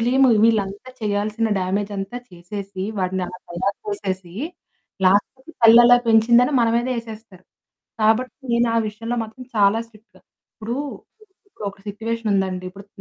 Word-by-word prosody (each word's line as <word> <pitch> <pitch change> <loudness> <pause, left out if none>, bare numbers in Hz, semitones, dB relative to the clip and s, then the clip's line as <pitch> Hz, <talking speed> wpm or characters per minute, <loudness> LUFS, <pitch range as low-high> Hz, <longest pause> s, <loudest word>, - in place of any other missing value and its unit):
Blame 260 +3 +4
వీళ్ళంతా 215 +1 +1
చెయ్యాల్సిన 210 +1 -1
damage 195 +2 -1
అంతా 195 +4 -5
చేసేసి, 190 +2 -7 0.2
వాడినలా 185 -1 -2
తయారు 190 +3 -2 0.3
చేసేసి, 185 -3 -4 0.7
లాస్ట్‌కి 260 - +1
తల్లలా 240 +2 +8
పెంచిందని 235 +4 +5
మన 230 - +3
మీదే 240 +2 +1
యేసేస్తారు. 220 -5 -9 0.6
కాబట్టి 225 +4 +2 0.2
నేను 235 0 +3
ఆ - - +2
విషయంలో 225 +3 -4
మాత్రం 225 +3 -9
చాలా 205 +1 +4
స్ట్రిక్టు. 220 0 -22 0.4
ఇప్పుడు, 225 +3 -5 0.7
ఇప్పుడొక 200 - -7
సిట్యుయేషనుందండి! 205 -4 -2
ఇప్పుడు 200 +2 -13
215 Hz, 120 wpm, -21 LUFS, 195-230 Hz, 0.7 s, తల్లలా